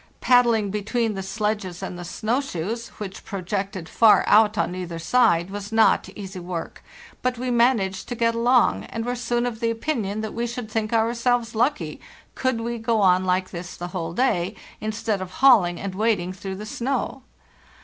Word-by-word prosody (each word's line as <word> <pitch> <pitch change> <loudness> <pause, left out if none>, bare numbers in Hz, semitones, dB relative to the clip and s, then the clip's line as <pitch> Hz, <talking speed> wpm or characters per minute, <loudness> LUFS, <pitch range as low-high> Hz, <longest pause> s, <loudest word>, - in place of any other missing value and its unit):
Paddling 235 -5 +4
between 215 +2 -1
the 195 - -4
sledges 195 -2 -3
and - - -5
the 175 - -7
snow 220 +9 -1
shoes, 230 - -4
which 195 -2 -7
projected 195 -2 -4
far 225 +2 +5
out 215 0 +5
on 175 - 0
either 180 -2 -5
side, 175 -1 +2
was 205 +1 -6
not 225 0 +3
easy 195 -2 -7
work; 175 -2 -6 0.4
but 250 -1 0
we 250 +1 -2
managed 230 -6 +2
to 245 - -3
get 230 0 +2
along, 240 +1 +3
and 225 0 -5
were 245 - -1
soon 240 0 -1
of 235 -2 -3
the 230 -1 +1
opinion 225 -4 -2
that 220 - -5
we 235 +1 -2
should 235 -2 -6
think 215 -1 -1
ourselves 235 +1 +1
lucky 255 +7 0 0.3
could 260 -3 -1
we 235 0 -3
go 225 0 +1
on 185 -2 +4
like 185 0 0
this 175 0 -7
the 175 0 -5
whole 170 -3 -4
day, 190 -4 +1 0.2
instead 215 -1 -2
of 185 0 -7
hauling 200 -10 +5
and 195 -1 -4
wading 195 -3 0
through 190 +1 -6
the 210 +2 -7
snow. 260 +3 -2
215 Hz, 180 wpm, -24 LUFS, 190-235 Hz, 0.4 s, far